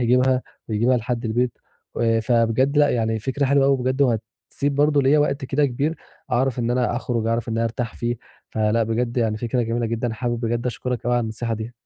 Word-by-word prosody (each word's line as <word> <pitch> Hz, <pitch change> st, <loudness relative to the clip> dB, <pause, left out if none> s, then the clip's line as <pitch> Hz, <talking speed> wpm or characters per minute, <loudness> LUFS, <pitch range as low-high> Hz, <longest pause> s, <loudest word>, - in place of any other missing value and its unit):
يجيبها 125 Hz, +1 st, +3 dB, 0.3 s
ويجيبها 115 Hz, +4 st, +2 dB
لحد 120 Hz, 0 st, -3 dB
البيت، 120 Hz, +2 st, 0 dB, 0.4 s
آآ 115 Hz, -1 st, +3 dB
فبجد 120 Hz, +4 st, +2 dB
لأ 145 Hz, 0 st, +5 dB
يعني 110 Hz, -2 st, 0 dB
فكرة 135 Hz, +5 st, -1 dB
حلوة 140 Hz, 0 st, +3 dB
أوي 140 Hz, 0 st, +4 dB
بجد 130 Hz, +2 st, 0 dB
وهتسيب 120 Hz, +3 st, -2 dB
برضه 145 Hz, 0 st, +3 dB
ليَّ 140 Hz, +3 st, +4 dB
وقت 145 Hz, -1 st, 0 dB
كده 145 Hz, +3 st, +2 dB
كبير 140 Hz, +5 st, -1 dB, 0.4 s
أعرَف 130 Hz, 0 st, +1 dB
إن 120 Hz, -1 st, 0 dB
أنا 125 Hz, -1 st, +1 dB
أخرُج، 120 Hz, -2 st, -2 dB
أعرَف 115 Hz, 0 st, -1 dB
إن 115 Hz, -, -1 dB
أنا 115 Hz, -, +1 dB
أرتاح 115 Hz, +1 st, -3 dB
فيه، 120 Hz, 0 st, -2 dB, 0.3 s
فلأ، 110 Hz, +1 st, +1 dB
بجد 115 Hz, +2 st, -1 dB
يعني 110 Hz, -3 st, +1 dB
فكرة 120 Hz, +2 st, -1 dB
جميلة 115 Hz, +1 st, -1 dB
جدًا، 115 Hz, +1 st, -2 dB
حابب 120 Hz, 0 st, -2 dB
بجد 120 Hz, +1 st, -1 dB
أشكرك 125 Hz, 0 st, -3 dB
أوي 120 Hz, -, +2 dB
على 120 Hz, -, +2 dB
النصيحة 115 Hz, +1 st, -3 dB
دي. 110 Hz, +2 st, -6 dB
120 Hz, 200 wpm, -22 LUFS, 115-130 Hz, 0.4 s, لأ